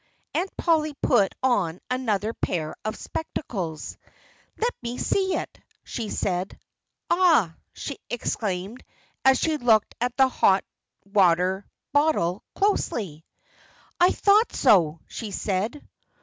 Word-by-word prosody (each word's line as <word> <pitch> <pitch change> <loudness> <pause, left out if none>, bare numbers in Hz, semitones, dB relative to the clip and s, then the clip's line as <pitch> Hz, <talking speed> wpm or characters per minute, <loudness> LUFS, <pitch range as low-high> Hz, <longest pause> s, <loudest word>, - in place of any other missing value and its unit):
Aunt 380 - 0
Polly 310 -3 +1
put 195 - +3
on 190 -10 +1
another 225 -4 0
pair 155 -7 -3
of 215 +1 -3
spectacles. 185 - -5 0.6
"Let 475 +2 0
me 240 0 -4
see 380 -1 +1
it!" - - -5 0.2
she 225 -4 -5
said. 185 -1 -2 0.5
"Aha!" 330 - +4 0.2
she 280 - -6
exclaimed, 210 -2 -3 0.4
as 265 0 +6
she 315 -2 +1
looked 225 -6 +3
at 245 0 -1
the 265 -1 +6
hot 195 -6 +3 0.4
water 190 -1 +2 0.3
bottle 285 - +2
closely. 205 - -1 0.7
"I 355 +1 +6
thought 415 +3 +3
so!" 170 - +4
she 225 - -6
said. 205 +7 -2
225 Hz, 115 wpm, -25 LUFS, 185-290 Hz, 0.7 s, as